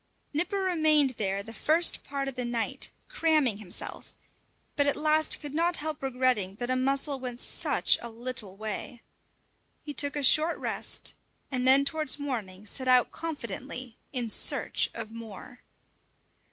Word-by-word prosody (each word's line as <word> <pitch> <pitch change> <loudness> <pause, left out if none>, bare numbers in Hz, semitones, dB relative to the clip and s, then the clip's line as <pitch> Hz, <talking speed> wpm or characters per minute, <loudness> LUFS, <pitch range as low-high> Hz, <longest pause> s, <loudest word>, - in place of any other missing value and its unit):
Nipper 350 +7 0
remained 310 -6 +4
there 200 -4 -2
the 225 - -9
first 320 +8 +2
part 275 -1 -3
of 270 - -3
the 250 0 -3
night, 240 -2 -2 0.2
cramming 310 - +2
himself, 195 -5 -4 0.6
but 285 0 +2
at 285 - +3
last 310 +1 +2
could 290 -2 -7
not 340 +2 +1
help 310 0 -4
regretting 250 -7 0
that 245 +3 -3
a - - +2
mussel 275 +2 0
went 250 -2 -5
such - - +2
a 235 - -5
little 230 -4 -3
way. 220 +3 -5 0.8
He 295 - -6
took 285 0 +2
a 290 - -2
short 310 +5 +5
rest, - - -2 0.4
and 255 -1 0
then 270 +2 +7
towards 305 -1 +2
morning 215 -9 -4
set 260 +5 -4
out 250 -1 +5
confidently 260 -5 -6 0.2
in 245 -5 -2
search - - +1
of 215 - -6
more. 230 +1 -10
260 Hz, 155 wpm, -29 LUFS, 230-295 Hz, 0.8 s, then